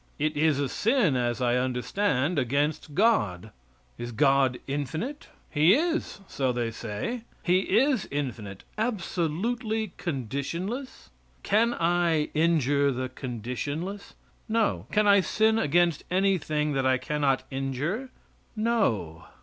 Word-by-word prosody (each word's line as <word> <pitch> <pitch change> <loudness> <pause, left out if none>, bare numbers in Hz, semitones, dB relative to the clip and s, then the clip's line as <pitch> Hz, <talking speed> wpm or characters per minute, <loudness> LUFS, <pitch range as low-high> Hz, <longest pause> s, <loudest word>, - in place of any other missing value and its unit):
It 155 +1 0
is 150 -1 +2
a 140 - +1
sin, 215 - +2
as 120 0 0
I 120 0 +2
understand, 130 +5 0
against 145 +3 -1
God. 110 - +2 0.5
Is 120 0 -5
God 135 0 +3
infinite? 155 - -4 0.2
He 160 +6 +5
is, 325 - -1
so 130 -2 -1
they 120 -2 -2
say; 115 - -4 0.2
He 185 +3 +2
is 260 -3 +2
infinite; 115 -9 -4 0.2
absolutely 220 - -1
conditionless? 170 - -4 0.3
Can 230 +3 +2
I 170 -2 +1
injure 145 -3 +2
the 130 0 -3
conditionless? 135 - -5 0.3
No. 120 - 0
Can 210 0 +3
I 200 0 +7
sin 220 +3 +2
against 170 -1 +2
anything 160 -6 +1
that 135 -1 0
I 130 0 +3
cannot 135 0 0
injure? 140 - -2 0.5
No. 120 - 0
150 Hz, 115 wpm, -27 LUFS, 130-205 Hz, 0.5 s, I